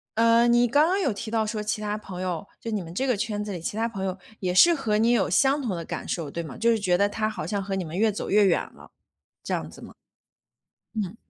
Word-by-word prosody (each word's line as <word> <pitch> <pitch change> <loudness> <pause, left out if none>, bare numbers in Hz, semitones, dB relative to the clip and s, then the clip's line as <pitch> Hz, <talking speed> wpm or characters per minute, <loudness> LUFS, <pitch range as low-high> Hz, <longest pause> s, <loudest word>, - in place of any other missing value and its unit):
呃， 230 +1 +5
你 240 0 +4
刚 290 +6 +4
刚 375 +3 +1
有 320 -10 +1
提 220 +2 -6
到 220 -1 +1
说 215 0 -3
其 210 0 -2
他 210 0 -2
朋 190 -4 -8
友， 185 0 -3
就 230 - -5
你 210 -2 -1
们 165 -1 -9
这 260 +9 -1
个 250 -3 +2
圈 210 0 -2
子 210 - -5
里 180 - -4
其 170 - -4
他 225 +1 0
朋 195 -4 -4
友 190 0 -3 0.2
也 180 -2 -1
是 340 - +7
和 225 -9 0
你 225 +2 +3
有 240 - +2
相 275 +1 +3
同 225 -8 -2
的 170 - -5
感 - - -6
受， 160 -5 -3
对 170 - -3
吗？ 155 -5 -8
就 235 0 +3
是 225 - +1
觉 180 -3 +2
得 200 +2 +2
他 215 +1 -1
好 220 - -5
像 205 -2 -2
和 195 0 -3
你 190 - -2
们 165 +1 -6
越 220 +2 +3
走 205 - -5
越 205 0 +5
远 - - +3
了， - - -16 0.5
这 - - -2
样 - - -4
子 - - -14
吗？ - - -11 1.0
嗯。 205 -2 -3
210 Hz, 300 characters per minute, -25 LUFS, 190-230 Hz, 1.0 s, 是